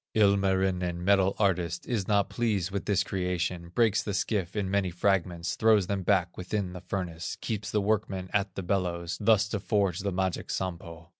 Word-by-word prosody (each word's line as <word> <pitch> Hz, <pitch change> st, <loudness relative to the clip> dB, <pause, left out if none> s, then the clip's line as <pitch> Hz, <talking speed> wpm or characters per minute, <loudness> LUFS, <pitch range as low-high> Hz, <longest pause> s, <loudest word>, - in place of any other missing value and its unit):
Ilmarinen, 95 Hz, -4 st, +2 dB
metal 95 Hz, -1 st, +4 dB
artist, 90 Hz, -4 st, 0 dB
Is 110 Hz, -6 st, -2 dB
not 100 Hz, -2 st, +3 dB
pleased 105 Hz, -6 st, -1 dB
with 100 Hz, -1 st, -3 dB
this 100 Hz, -2 st, +2 dB
creation, 90 Hz, -2 st, -2 dB
Breaks 110 Hz, +2 st, +2 dB
the 100 Hz, -, -3 dB
skiff 100 Hz, -3 st, -1 dB
in 105 Hz, -2 st, -1 dB
many 95 Hz, -1 st, +1 dB
fragments, 90 Hz, -1 st, 0 dB
Throws 110 Hz, -3 st, +4 dB
them 100 Hz, +1 st, -2 dB
back 90 Hz, 0 st, +1 dB
within 95 Hz, 0 st, -3 dB
the 90 Hz, -, -8 dB
furnace, 90 Hz, -3 st, -4 dB
Keeps 105 Hz, -2 st, -3 dB
the 105 Hz, -, +1 dB
workmen 100 Hz, -3 st, -1 dB
at 100 Hz, -2 st, 0 dB
the 95 Hz, -, -4 dB
bellows, 90 Hz, -2 st, -1 dB
Thus 110 Hz, 0 st, +4 dB
to 105 Hz, -, -2 dB
forge 100 Hz, -3 st, 0 dB
the 100 Hz, 0 st, -2 dB
magic 95 Hz, -1 st, -2 dB
Sampo. 85 Hz, -2 st, -5 dB
95 Hz, 175 wpm, -28 LUFS, 90-100 Hz, -, metal